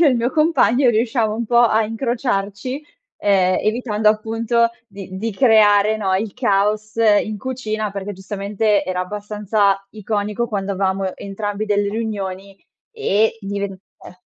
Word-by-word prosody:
io 335 - +6
e - - +7
il 250 - +1
mio 235 +1 +1
compagno 285 -6 +3
riusciamo 225 -1 +1
un 230 +2 -3
po' 240 +1 +4
a 220 -2 +4
incrociarci, 235 +2 -2 0.4
ehm, 185 -2 +3
evitando 215 -1 +1
appunto 225 +2 +1 0.2
di 195 -2 -10
di 225 +4 -2
creare, 215 -2 +4
no, 195 -3 -1
il 205 +1 -3
caos 215 -2 0
in 215 -1 +2
cucina 215 -4 -3
perché, 200 +1 -5
giustamente 200 +2 -1
era 185 -1 -3
abbastanza 205 0 -1
iconico 210 +2 -2
quando 200 -1 -2
avevamo 190 -1 -1
entrambi 205 +1 -4
delle 205 -1 +1
riunioni 200 -3 -4 0.3
e 225 - +1
diven 200 0 -3 0.3
eh 180 - -13
210 Hz, 145 wpm, -20 LUFS, 200-225 Hz, 0.4 s, e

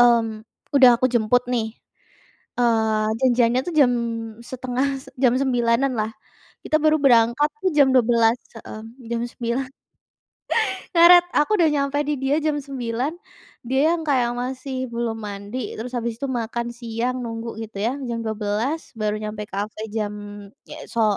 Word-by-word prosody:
Mmm. 230 -2 +4 0.3
Udah 255 -3 +7
aku 245 - -2
jemput 245 0 +2
nih, 220 -2 -2 0.8
eee, 220 -3 +2
janjiannya 245 -1 +3
tuh 350 - -4
jam 270 -5 +5 0.5
setengah 260 +2 -2 0.2
jam 250 -3 +4
09.00-an 250 0 +1
lah, 215 0 0 0.5
kita 310 - +2
baru 310 0 +4
berangkat 240 +2 +4
tuh 380 -2 +1
jam 280 -2 +6
12.00, 235 -1 +4 0.2
heeh, 215 0 -9 0.3
jam 235 0 -1
09.00. 240 +2 -3 1.3
Ngaret, 350 +1 +8
aku 295 - +3
udah 330 - +5
nyampe 280 -1 0
di 300 - +1
dia 270 +2 +1
jam 305 -1 0
9.00, 260 0 -3 0.5
dia 275 +7 +3
yang 330 - -6
kayak 250 -4 +2
masih 260 +1 -4
belum 235 -1 -2
mandi, 205 +3 -5
terus 240 +3 -6
habis 235 -1 -2
itu 275 - -1
makan 235 -1 -2
siang, 240 +1 -3
nunggu 230 0 -5
gitu 215 -2 -10
ya, 235 +4 0
jam 230 -1 -3
12.00 220 +8 -2
baru 215 -1 0
nyampe 210 0 -5
kafe, 210 +2 -4
jam 210 -2 -1 0.8
so 220 -3 +2
240 Hz, 145 wpm, -22 LUFS, 225-265 Hz, 1.3 s, Ngaret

